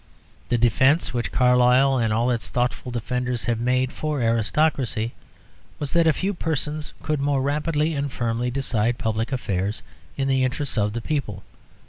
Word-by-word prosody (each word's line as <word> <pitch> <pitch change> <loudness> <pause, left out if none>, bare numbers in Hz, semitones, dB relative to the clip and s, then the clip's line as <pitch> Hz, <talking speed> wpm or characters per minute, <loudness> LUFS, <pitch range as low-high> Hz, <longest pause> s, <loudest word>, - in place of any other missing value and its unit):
The 120 - +2
defence 130 +7 +3
which 120 -1 -2
Carlyle 125 +1 +4
and 115 -2 +1
all 115 +3 +2
its 120 -2 -1
thoughtful 125 +1 -1
defenders 125 +1 -2
have 120 -2 -1
made 130 +2 +1
for 150 -2 -2
aristocracy 115 0 +1 0.6
was 145 -2 -4
that 170 -1 +4
a - - +6
few 195 +6 -1
persons 155 -3 -3
could 155 -2 -1
more 140 -1 +1
rapidly 150 +2 0
and 140 -1 -2
firmly 120 0 -1
decide 120 -3 0
public 110 0 -2
affairs 100 -5 -2 0.3
in 135 - 0
the 135 -1 +2
interests 130 +2 -1
of 105 -2 +1
the 120 - -3
people. 135 -6 -3
125 Hz, 160 wpm, -23 LUFS, 120-145 Hz, 0.6 s, a